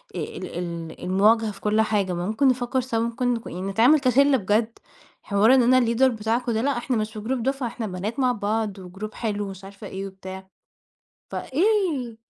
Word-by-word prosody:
آآ - - -3
ال - - -5
ال 170 -2 -6
المواجهة 210 +4 +3
في - - -14
كل 215 +1 +2
حاجة، 205 -4 0
ما 175 0 -3
ممكن 220 +6 +2
نفكر 255 0 +1
سوا 235 -2 -2
ممكن 235 +1 0
ك 230 - -10
يعني 180 - -6
نتعامل 225 +10 +4
كشلّة 270 +1 +4
بجد 220 +3 0 0.4
حوار 210 +5 +4
إن 255 - +5
أنا 255 - +6
الleader 235 +2 +1
بتاعكم 230 +2 -1
ده 220 -1 0
لأ 275 0 0
إحنا 240 0 -1
مش 215 0 -2
في 215 - -6
group 245 +3 -2
دفعة 270 +1 -1
إحنا 230 -1 -5
بنات 200 +7 -4
مع 255 -2 +3
بعض 210 -2 -2
وgroup 195 +4 -8
حلو 205 -3 -3
مش 190 0 -10
وعارفة 200 +1 -10
إيه 195 +1 -5
وبتاع 190 0 -9 0.8
ف - - -8
إيه 320 - 0
220 Hz, 200 wpm, -24 LUFS, 200-250 Hz, 0.8 s, أنا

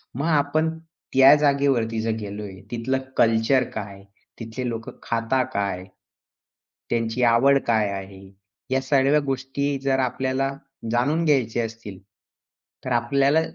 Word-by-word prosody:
मग 140 +4 -2
आपण 155 0 +2 0.4
त्या 135 +1 +8
जागेवरती 140 -6 +1
जर 115 0 -1
गेलोय 100 -2 -7
तिथलं 120 +3 -1 0.2
कल्चर 115 +3 +3
काय? 100 -2 -7 0.4
तिथले 115 +2 -5
लोक 115 -1 -5
खातां 115 +3 0
काय? 100 -2 -2 1.1
त्यांची 115 +1 -1
आवड 130 +4 +5
काय 110 -3 +2
आहे? 95 0 -8 0.5
या 130 0 +2
सगळ्या 135 +2 +3
गोष्टी 135 +1 -2
जर 135 -1 +1
आपल्याला 130 +1 -1 0.4
जाणून 145 +8 +1
घ्यायच्या 120 -6 +1
असतील. 110 -4 -9 0.9
तर 130 - -3
आपल्याला 140 +6 +2
125 Hz, 120 wpm, -23 LUFS, 115-135 Hz, 1.1 s, त्या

